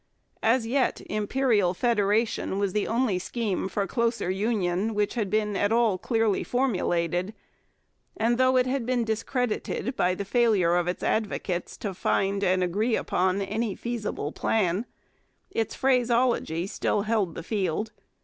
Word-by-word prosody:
As 230 Hz, +1 st, +2 dB
yet 260 Hz, +3 st, +1 dB
Imperial 210 Hz, -3 st, +1 dB
Federation 215 Hz, -2 st, +1 dB
was 200 Hz, -2 st, 0 dB
the 210 Hz, -, 0 dB
only 230 Hz, -5 st, +1 dB
scheme 200 Hz, -2 st, -2 dB
for 200 Hz, +1 st, -1 dB
closer 230 Hz, -3 st, 0 dB
union 200 Hz, 0 st, 0 dB
which 205 Hz, -1 st, 0 dB
had 220 Hz, -5 st, -1 dB
been 210 Hz, -1 st, 0 dB
at 205 Hz, +2 st, +1 dB
all 225 Hz, -5 st, +3 dB
clearly 225 Hz, -3 st, +1 dB
formulated, 185 Hz, -6 st, 0 dB, 0.8 s
and, 235 Hz, +2 st, +1 dB
though 255 Hz, 0 st, +4 dB
it 250 Hz, -, +4 dB
had 260 Hz, 0 st, -1 dB
been 250 Hz, -2 st, +1 dB
discredited 230 Hz, +2 st, -2 dB
by 180 Hz, -4 st, +1 dB
the 200 Hz, -, -4 dB
failure 200 Hz, -6 st, +3 dB
of 175 Hz, 0 st, +1 dB
its 180 Hz, -, -3 dB
advocates 195 Hz, -5 st, -2 dB
to 200 Hz, -3 st, -4 dB
find 195 Hz, +2 st, 0 dB
and 185 Hz, -1 st, +2 dB
agree 210 Hz, +6 st, +1 dB
upon 185 Hz, +2 st, 0 dB
any 215 Hz, +1 st, -2 dB
feasible 220 Hz, -11 st, -4 dB
plan, 200 Hz, +2 st, 0 dB, 0.6 s
its 225 Hz, -, -2 dB
phraseology 240 Hz, -9 st, +1 dB
still 200 Hz, +1 st, -1 dB
held 210 Hz, -6 st, 0 dB
the 165 Hz, -, -6 dB
field. 200 Hz, +1 st, -1 dB
210 Hz, 145 wpm, -26 LUFS, 190-235 Hz, 0.8 s, though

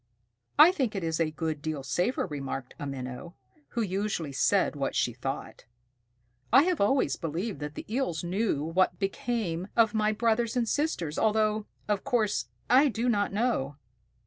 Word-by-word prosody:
"I 305 Hz, +4 st, +9 dB
think 265 Hz, -, -1 dB
it 195 Hz, -, -2 dB
is 160 Hz, 0 st, -1 dB
a 165 Hz, -2 st, +2 dB
good 155 Hz, -1 st, -3 dB
deal 155 Hz, -2 st, -3 dB
safer," 175 Hz, -, 0 dB
remarked 135 Hz, -5 st, -5 dB
a 145 Hz, -, -4 dB
Minnow, 130 Hz, +5 st, -6 dB, 0.4 s
who 230 Hz, -, +3 dB
usually 190 Hz, -6 st, -2 dB
said 135 Hz, -, +2 dB
what -, -, -2 dB
she -, -, +1 dB
thought. -, -, -5 dB, 0.9 s
"I 265 Hz, +5 st, +7 dB
have 355 Hz, -, 0 dB
always 200 Hz, -, +2 dB
believed 170 Hz, +3 st, -3 dB
that 150 Hz, 0 st, -6 dB
the -, -, -6 dB
Eels 220 Hz, -9 st, -1 dB
knew 180 Hz, -4 st, 0 dB
what 170 Hz, +4 st, +1 dB
became 195 Hz, -3 st, -2 dB
of 225 Hz, -2 st, +5 dB
some 220 Hz, -, -2 dB
of -, -, +2 dB
my 215 Hz, 0 st, +3 dB
brothers 230 Hz, +2 st, +1 dB
and 235 Hz, -2 st, +1 dB
sisters, 215 Hz, -, -1 dB
although, 215 Hz, -1 st, +2 dB, 0.2 s
of 210 Hz, -2 st, 0 dB
course, 235 Hz, -6 st, 0 dB, 0.2 s
I 265 Hz, +4 st, +6 dB
do 240 Hz, -1 st, 0 dB
not 205 Hz, -3 st, +1 dB
know." 200 Hz, -, 0 dB
205 Hz, 175 wpm, -28 LUFS, 160-230 Hz, 0.9 s, I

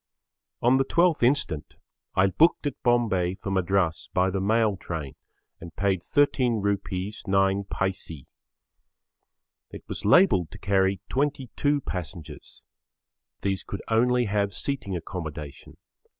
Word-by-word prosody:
On 125 Hz, +2 st, +5 dB
the 135 Hz, -, +3 dB
12th 170 Hz, +3 st, +2 dB
instant 120 Hz, -, 0 dB, 0.4 s
I 95 Hz, -, +4 dB
booked 150 Hz, -, +3 dB
at 145 Hz, -, -3 dB
Bombay 105 Hz, -7 st, +1 dB
for 100 Hz, 0 st, -6 dB
Madras 95 Hz, -3 st, 0 dB
by 95 Hz, +1 st, +3 dB
the 95 Hz, 0 st, -2 dB
mail 110 Hz, +1 st, +2 dB
train 80 Hz, -6 st, -6 dB, 0.5 s
and 85 Hz, 0 st, -11 dB
paid 100 Hz, -1 st, +1 dB
Rs. -, -, -25 dB
13 115 Hz, -8 st, +2 dB, 0.5 s
9. 95 Hz, +1 st, +2 dB, 2.0 s
It -, -, -10 dB
was -, -, -6 dB
labelled 105 Hz, -, +5 dB
to -, -, -11 dB
carry 95 Hz, -1 st, +1 dB
22 145 Hz, +1 st, 0 dB
passengers. 80 Hz, -, -7 dB, 0.8 s
These 95 Hz, -2 st, -1 dB
could 100 Hz, -, -7 dB
only 125 Hz, +2 st, +3 dB
have 100 Hz, -1 st, -1 dB
seating 135 Hz, -9 st, -3 dB
accommodation. 80 Hz, -5 st, -7 dB
100 Hz, 120 wpm, -26 LUFS, 90-120 Hz, 2.0 s, On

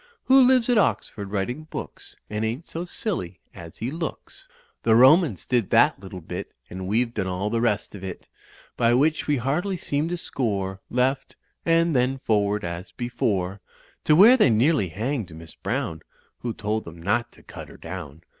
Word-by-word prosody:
Who 265 Hz, +1 st, +7 dB
lives 255 Hz, -2 st, +4 dB
at 245 Hz, -3 st, +4 dB
Oxford 100 Hz, -, -1 dB
writing 105 Hz, +10 st, -3 dB
books, -, -, -8 dB
And 105 Hz, +1 st, -3 dB
ain't 120 Hz, +9 st, -3 dB
so 170 Hz, +2 st, -5 dB
^illy 170 Hz, -, -4 dB, 0.2 s
as 85 Hz, -1 st, -11 dB
he 120 Hz, +4 st, -3 dB
looks; 165 Hz, -, -6 dB, 0.3 s
The 110 Hz, -, +4 dB
Romans 130 Hz, -, +5 dB
did 120 Hz, -6 st, +1 dB
that -, -, +4 dB
little 95 Hz, -1 st, -9 dB
bit -, -, -6 dB, 0.2 s
And 95 Hz, +1 st, -5 dB
we've 115 Hz, +4 st, +1 dB
done 100 Hz, -4 st, -2 dB
all 95 Hz, +3 st, -2 dB
the 115 Hz, 0 st, 0 dB
rest 115 Hz, -4 st, 0 dB
of 100 Hz, -2 st, -9 dB
it; 95 Hz, -2 st, -7 dB, 0.5 s
By 120 Hz, 0 st, +3 dB
which 150 Hz, +4 st, +2 dB
we 145 Hz, -1 st, +2 dB
hardly 155 Hz, +10 st, -1 dB
seem 145 Hz, -1 st, -1 dB
to 175 Hz, -, -2 dB
score; 100 Hz, -, -3 dB
Left, 130 Hz, +2 st, 0 dB, 0.3 s
and 165 Hz, -1 st, +3 dB
then 130 Hz, +2 st, +2 dB
forward 105 Hz, -3 st, 0 dB
as 85 Hz, +1 st, -5 dB
before 100 Hz, -5 st, -2 dB, 0.4 s
To 150 Hz, -, +5 dB
where 220 Hz, +9 st, +8 dB
they 215 Hz, -, +5 dB
nearly 120 Hz, -, +3 dB
hanged 110 Hz, -, -3 dB
Miss 80 Hz, 0 st, -11 dB
Browne, 115 Hz, -, -3 dB, 0.4 s
Who 120 Hz, -, -3 dB
told 110 Hz, +1 st, -2 dB
them 85 Hz, 0 st, -10 dB
not 105 Hz, +7 st, 0 dB
to -, -, -19 dB
cut -, -, -10 dB
her -, -, -13 dB
down. 75 Hz, +3 st, -8 dB
115 Hz, 180 wpm, -24 LUFS, 95-150 Hz, 0.5 s, where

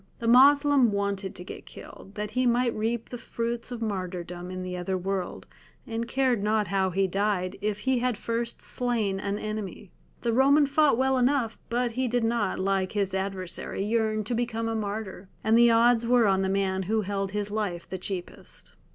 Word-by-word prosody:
The 230 Hz, -, -4 dB
Moslem 280 Hz, 0 st, +6 dB
wanted 200 Hz, -1 st, -2 dB
to 180 Hz, -, -8 dB
get -, -, -10 dB
killed, 195 Hz, -, -12 dB
that 210 Hz, 0 st, -4 dB
he 255 Hz, +3 st, +1 dB
might 240 Hz, 0 st, +2 dB
reap 225 Hz, +1 st, -2 dB
the 245 Hz, -, -6 dB
fruits 235 Hz, +1 st, -4 dB
of 235 Hz, -2 st, -4 dB
martyrdom 180 Hz, -3 st, -4 dB
in 185 Hz, 0 st, -5 dB
the 180 Hz, 0 st, -4 dB
other 185 Hz, +1 st, -2 dB
world, 190 Hz, 0 st, -3 dB, 0.4 s
and 230 Hz, 0 st, -3 dB
cared 255 Hz, -3 st, +1 dB
not 210 Hz, -2 st, +1 dB
how 190 Hz, -1 st, +1 dB
he 195 Hz, +2 st, +1 dB
died, 190 Hz, -1 st, -1 dB
if 210 Hz, 0 st, -2 dB
he 260 Hz, -2 st, +1 dB
had 250 Hz, -2 st, 0 dB
first 230 Hz, +1 st, -3 dB
slain 225 Hz, -6 st, -1 dB
an 200 Hz, +1 st, -2 dB
enemy. 210 Hz, -3 st, -5 dB, 0.3 s
The 235 Hz, -1 st, +1 dB
Roman 280 Hz, +4 st, +5 dB
fought 285 Hz, -2 st, +3 dB
well 265 Hz, 0 st, +2 dB
enough; 250 Hz, -3 st, +1 dB
but 240 Hz, +1 st, 0 dB
he 255 Hz, +2 st, -1 dB
did 245 Hz, 0 st, 0 dB
not, 230 Hz, -1 st, 0 dB
like 190 Hz, 0 st, 0 dB
his 200 Hz, -2 st, -1 dB
adversary, 190 Hz, 0 st, -3 dB
yearn 215 Hz, -1 st, 0 dB
to 220 Hz, -, -3 dB
become 230 Hz, -1 st, -1 dB
a 225 Hz, -, -1 dB
martyr, 205 Hz, -3 st, -4 dB
and 220 Hz, +1 st, +3 dB
the 235 Hz, 0 st, +7 dB
odds 230 Hz, 0 st, +4 dB
were 245 Hz, -1 st, +4 dB
on 195 Hz, -1 st, +3 dB
the 190 Hz, -, 0 dB
man 190 Hz, -1 st, 0 dB
who 220 Hz, 0 st, +2 dB
held 195 Hz, -1 st, -3 dB
his 205 Hz, 0 st, -2 dB
life 205 Hz, -5 st, -3 dB
the 190 Hz, -, -5 dB
cheapest. 185 Hz, -1 st, -7 dB
215 Hz, 195 wpm, -27 LUFS, 195-235 Hz, 0.4 s, the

